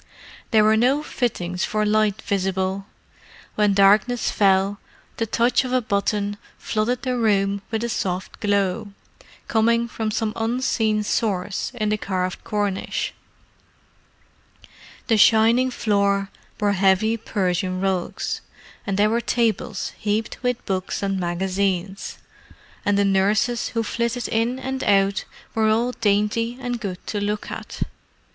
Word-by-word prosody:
There 220 -2 +5
were 215 +1 +5
no 265 +6 +3
fittings 180 - -2
for 215 0 0
light 215 0 +1
visible: 190 0 -1 0.7
when 210 -2 +2
darkness 210 +5 +4
fell, 195 0 +2 0.4
the 225 - -1
touch 235 +4 +2
of 255 - -4
a 255 - +4
button 205 -2 -1 0.2
flooded 235 +3 -1
the 255 -1 0
room 200 -4 +1
with 225 0 -2
a - - 0
soft 185 -4 -3
glow, 200 0 0 0.5
coming 230 +1 +2
from 220 -1 -3
some 215 0 -1
unseen 225 -2 0
source 205 -3 -1
in 215 -3 -1
the 210 0 0
carved 185 -2 -2
cornice. 205 -2 -2 1.9
The 225 - +3
shining 230 +4 +5
floor 200 -4 +1 0.3
bore 205 -1 +1
heavy 195 +3 +3
Persian 185 -4 -1
rugs, 190 -2 -2 0.5
and 195 -1 0
there 205 +1 +4
were 235 +1 +1
tables 235 -2 -1
heaped 215 +1 -2
with 250 -1 -1
books 190 +1 -2
and 195 -1 0
magazines; 190 +2 -2 0.7
and 205 0 +2
the 200 - +3
nurses 200 +5 +2
who 230 - +1
flitted 235 +2 -2
in 230 +3 0
and 265 0 -4
out 195 -1 +2 0.3
were 220 -1 +2
all 230 +3 +2
dainty 225 +2 0
and 245 -2 -3
good 185 -4 -5
to 205 - -3
look 210 +1 -2
at. - - -5
210 Hz, 135 wpm, -23 LUFS, 195-230 Hz, 1.9 s, There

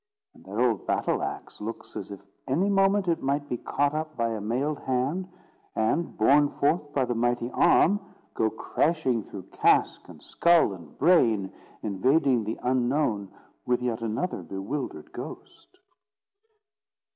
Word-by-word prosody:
And - - -19
that 100 +2 -7
old 120 -5 +1
battle - - 0
axe - - -6
looks 115 +2 -7
as 95 - -6
if 100 -1 -8 0.3
any 170 +10 +1
moment 195 0 +3
it 170 -1 +1
might 140 +2 -1
be 125 - -2
caught 145 +4 0
up 155 0 -4
by 115 0 +1
a 110 -2 -3
mailed 130 +8 -1
hand, 135 +9 -1 0.5
and, 130 +10 0
borne 140 +6 +5
forth 145 +1 0
by 135 -3 +1
the 120 - -1
mighty 120 +1 0
arm, 205 +4 +4 0.3
go 110 - +1
crashing 130 +1 0
through 95 -1 -9
casque, - - +2
and - - -12
skull, 170 - +3
and 85 -3 -13
brain, 115 - +3 0.3
invading 125 +5 +2
the 110 - -3
Unknown 125 -5 0 0.4
with 125 0 +2
yet 120 -2 -2
another 115 - -2
bewildered 100 - -5
ghost. 370 - -10
125 Hz, 145 wpm, -27 LUFS, 110-155 Hz, 0.5 s, borne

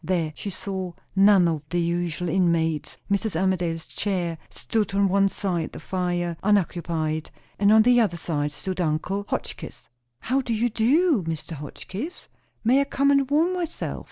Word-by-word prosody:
There 165 -3 0
she 205 - -5
saw 190 -2 -4 0.2
none 195 -2 +6
of 160 -3 -1
the 175 - 0
usual 175 0 -1
inmates. 165 -3 +1
Mrs. 200 -1 0
Armadale's 175 -3 0
chair 175 -5 -2
stood 210 -3 -2
on 200 0 +4
one 195 +1 +3
side 180 -5 -2
the - - -7
fire, 175 -2 -2
unoccupied, 170 -6 0 0.3
and 200 +1 +5
on 220 0 +7
the 245 +1 +5
other 185 -6 0
side 150 -3 -2
stood 185 +4 -4
uncle 175 +5 -1
Tim - - -27
Hotchkiss. - - -5 0.3
"How 265 +3 +1
do 235 -3 -2
you 235 +3 +1
do, 265 - +3
Mr. 160 0 -4
Hotchkiss? 185 - -7 0.3
May 255 +5 +4
I - - +1
come 280 0 +2
and 275 -1 +3
warm 320 +5 +3
myself? 350 -3 -3
190 Hz, 165 wpm, -25 LUFS, 170-220 Hz, 0.3 s, on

